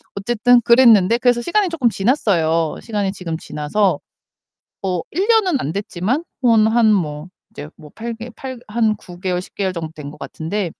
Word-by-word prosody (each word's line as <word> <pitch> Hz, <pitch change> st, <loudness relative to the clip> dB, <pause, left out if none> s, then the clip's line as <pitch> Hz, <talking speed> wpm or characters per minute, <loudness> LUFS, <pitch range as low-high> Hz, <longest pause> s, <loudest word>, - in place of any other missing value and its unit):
어쨌든 240 Hz, +4 st, +3 dB
그랬는데 235 Hz, -3 st, +5 dB
그래서 245 Hz, -1 st, +2 dB
시간이 395 Hz, -, +1 dB
조금 305 Hz, -8 st, 0 dB
지났어요. 170 Hz, -, +1 dB
시간이 205 Hz, -4 st, -2 dB
지금 170 Hz, -4 st, -5 dB
지나서 165 Hz, +7 st, -1 dB, 0.8 s
어 180 Hz, -3 st, -1 dB
1 380 Hz, +7 st, 0 dB
년은 395 Hz, -, +3 dB
안 145 Hz, -, -3 dB
됐지만 205 Hz, -, -2 dB, 0.2 s
뭐 235 Hz, -2 st, +5 dB
한 220 Hz, 0 st, +4 dB
뭐 150 Hz, -3 st, -2 dB, 0.2 s
이제 150 Hz, -9 st, -8 dB
뭐 150 Hz, -2 st, -14 dB
8 235 Hz, +1 st, -5 dB
개 235 Hz, +2 st, -8 dB, 0.4 s
한 215 Hz, 0 st, +1 dB
9개월 180 Hz, -1 st, -4 dB
10 -, -, -15 dB
개월 190 Hz, -2 st, -1 dB
정도 165 Hz, -2 st, -5 dB
된 145 Hz, -2 st, -8 dB
것 150 Hz, -, -15 dB
같은데 175 Hz, +2 st, -4 dB
210 Hz, 295 characters per minute, -19 LUFS, 175-235 Hz, 0.8 s, 그랬는데